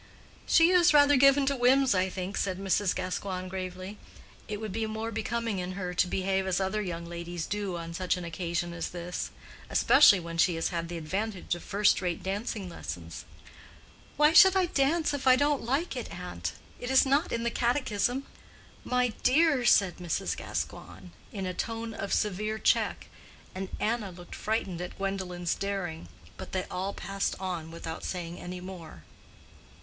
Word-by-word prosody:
"She 335 +1 +6
is 350 -3 +5
rather 290 0 +7
given 275 +1 +5
to 280 +1 +1
whims, 260 +1 +4
I 185 0 +1
think," 185 +1 -5
said 185 -2 -1
Mrs. 195 0 +1
Gascoigne, 185 0 -3
gravely. 185 +2 -6 0.5
"It 210 -1 -4
would 215 -2 -5
be 220 +2 -2
more 220 +1 -4
becoming 225 -1 -2
in 180 +1 -4
her 180 -2 -4
to 180 - +2
behave 190 +1 0
as 185 -1 +1
other 195 +2 0
young 170 -4 -4
ladies 170 0 -5
do 200 -4 -3
on 165 0 -6
such 185 +1 0
an 180 - -5
occasion 170 0 -3
as 170 -1 -4
this; 175 0 -5 0.4
especially 205 -10 +6
when 165 -1 -6
she 175 0 +4
has 165 - -1
had 170 -1 -3
the 175 - -4
advantage 190 +5 -3
of 175 - -5
first 205 0 +2
rate 175 -2 -2
dancing 200 0 -3
lessons." 85 - -7 0.9
"Why 300 +2 +5
should 380 +1 +8
I 380 -1 +4
dance 310 0 +1
if 275 -2 -3
I 255 - +8
don't 285 +1 +2
like 275 +9 -1
it, - - -5
aunt? - - -5 0.3
It 245 - -5
is 265 +1 +5
not 280 +5 +2
in 230 - -1
the 235 - 0
catechism." 245 +1 0 0.6
"My 250 0 +1
dear!" 285 -1 +4
said 195 -5 +4
Mrs. 175 -3 -2
Gascoigne, - - -6 0.2
in 195 -2 -4
a 185 - -2
tone 225 +3 -4
of 200 - -5
severe 215 +2 0
check, - - +1 0.5
and 190 0 -5
Anna 220 -2 -1
looked 175 0 -12
frightened 195 -5 -2
at 180 - -7
Gwendolen's 185 -3 -2
daring. 190 - -4 0.3
But - - -9
they 185 -1 0
all 190 +2 -3
passed 195 0 -2
on 180 -4 -4
without 165 -1 -7
saying 175 -2 -5
any 180 0 -7
more. 175 - -9
195 Hz, 175 wpm, -29 LUFS, 180-235 Hz, 0.9 s, should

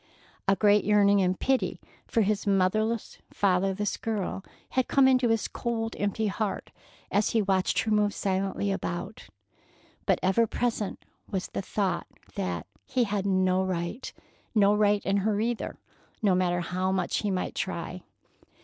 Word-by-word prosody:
A 195 - +5
great 205 0 +4
yearning 205 -1 +4
and 185 0 +1
pity 265 -1 0 0.3
for 230 - +2
his 205 +1 -1
motherless, 210 +4 +1
fatherless 195 +1 +1
girl 205 -3 -3 0.3
had 260 -1 0
come 275 -1 +5
into 255 -2 +4
his 225 -1 +1
cold, 225 -2 -3
empty 205 +2 0
heart 210 0 -2 0.4
as 205 +1 +2
he - - 0
had 200 - -4
watched 190 -1 +1
her 220 - -2
move 210 -1 +3
silently 195 +1 -1
about. 190 +2 -4 0.8
But - - +4
ever 195 +5 +3
present 225 -3 -2 0.2
was 190 -2 -3
the - - -3
thought 195 0 -1 0.3
that 85 -3 -3 0.2
he 260 -3 +1
had 200 -2 -1
no 185 -1 +2
right—no 200 +3 -1
right 210 -1 +2
in 195 +1 +2
her 205 +1 +1
either, 230 +1 -2 0.5
no 200 -3 +4
matter 175 -1 +1
how 185 +2 -1
much 190 -2 0
he 210 - -1
might 185 -2 -2
try. 180 -1 -4
200 Hz, 150 wpm, -28 LUFS, 185-215 Hz, 0.8 s, A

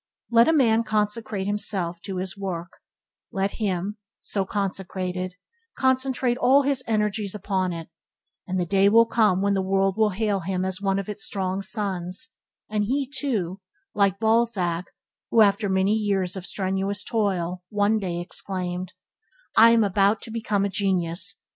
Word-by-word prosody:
Let 235 0 +6
a - - +5
man 230 -6 +4
consecrate 210 -2 -1
himself 190 -4 -2
to 190 -2 -4
his 185 -1 -4
work, 185 -3 -5 0.6
let 195 -2 -1
him, 205 0 -2 0.2
so 195 -2 -2
consecrated, 185 -2 -3 0.4
concentrate 260 -1 +1
all 275 +3 +5
his 275 -2 +1
energies 210 -2 0
upon 190 -2 -1
it, 165 -1 -6 0.6
and 185 0 -1
the 175 - 0
day 195 +2 +4
will 230 +2 +6
come 210 -5 +2
when 200 0 +2
the 195 - +1
world 195 +1 +1
will 220 -1 +4
hail 205 0 0
him 185 +1 -2
as 190 0 -3
one 195 -1 +1
of 195 - -3
its 210 -1 -5
strong 190 -1 -2
sons; 190 -3 -2 0.4
and 210 -1 0
he, 270 +4 0
too, 210 -10 -2 0.3
like 200 -2 +2
Balzac 220 -6 +1 0.4
who, 230 - +5
after 205 0 +3
many 190 +2 +2
years 200 -4 0
of 190 -1 -6
strenuous 195 +1 -1
toil, 185 -6 -1
one 210 +1 +2
day 175 -4 -3
exclaimed, 180 0 -2 0.6
"I 230 +1 +8
am 230 -1 +5
about 200 +1 +2
to 230 - -6
become 215 -3 0
a - - -1
genius! 180 -2 0
200 Hz, 160 wpm, -24 LUFS, 185-215 Hz, 0.6 s, I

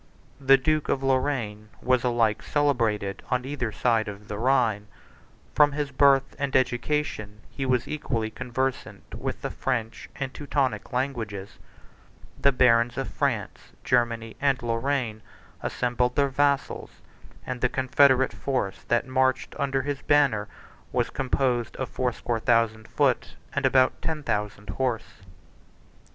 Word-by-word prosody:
The 135 0 +6
duke 155 +3 0
of 135 - 0
Lorraine, 130 -6 -1
was 130 -1 +2
alike 120 -3 +2
celebrated 115 -9 0
on 125 0 0
either 130 -5 -3
side 115 -1 +1
of 105 0 -8
the 105 - -4
Rhine: 115 -5 +2 0.7
from 145 -1 +5
his 145 -1 -2
birth 135 -1 +4
and 140 -1 -2
education, 120 -5 0
he 135 -1 -3
was 125 0 +1
equally 115 -7 -2
conversant 130 +3 -4
with - - -5
the - - -2
French 115 0 -3
and 135 -1 -4
Teutonic 135 -7 -1
languages: 115 -7 -3 0.8
the 140 - +5
barons 120 -2 +3
of - - -2
France, - - -3
Germany, 115 -2 0
and 140 -3 +1
Lorraine, 115 -1 -1 0.4
assembled 125 0 0
their 140 -1 +3
vassals; 140 +1 0 0.6
and 125 -1 -5
the 125 - +3
confederate 130 0 +3
force 125 -8 -2
that 120 +2 +2
marched 130 0 +1
under 135 -1 0
his 145 0 -3
banner 135 -8 +3 0.4
was - - 0
composed 130 -2 0
of 130 - -3
fourscore 120 -2 -2
thousand 115 -2 +1
foot - - 0 0.2
and - - +2
about 130 -1 +3
ten 155 -2 -3
thousand 105 -3 -2
horse. 120 -2 -3
125 Hz, 135 wpm, -26 LUFS, 115-135 Hz, 0.8 s, The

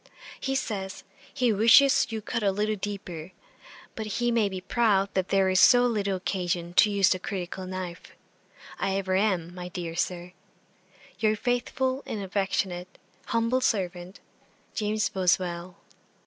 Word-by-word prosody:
He 270 - -2
says, 195 -7 -3 0.3
"he 250 -5 +1
wishes 230 +6 +6
you 225 - -2
would 215 - -8
cut 230 - -2
a 200 -2 +2
little 210 +2 0
deeper;" 190 -4 -6 0.6
but 220 -1 -5
he 240 0 +1
may 225 -3 +2
be 190 -1 -5
proud 200 -1 +1
that 190 -1 0
there 195 -1 +3
is 185 0 +3
so 245 +3 +7
little 205 -5 0
occasion 175 -2 -2
to 210 - +6
use 200 -2 +3
the 185 - +1
critical 185 0 -5
knife. 185 -2 -7 0.7
I 195 - 0
ever 190 -1 -1
am, 185 -4 0
my 180 0 -7
dear 175 -2 -5
Sir, 180 +1 -3 0.9
'Your 215 0 +2
faithful 255 +3 -1
and 215 - -4
affectionate, 190 -2 -2 0.3
'humble 230 +3 +1
servant, 185 -5 -2 0.5
'JAMES 215 0 0
BOSWELL.' 180 -1 0
195 Hz, 150 wpm, -27 LUFS, 185-220 Hz, 0.9 s, so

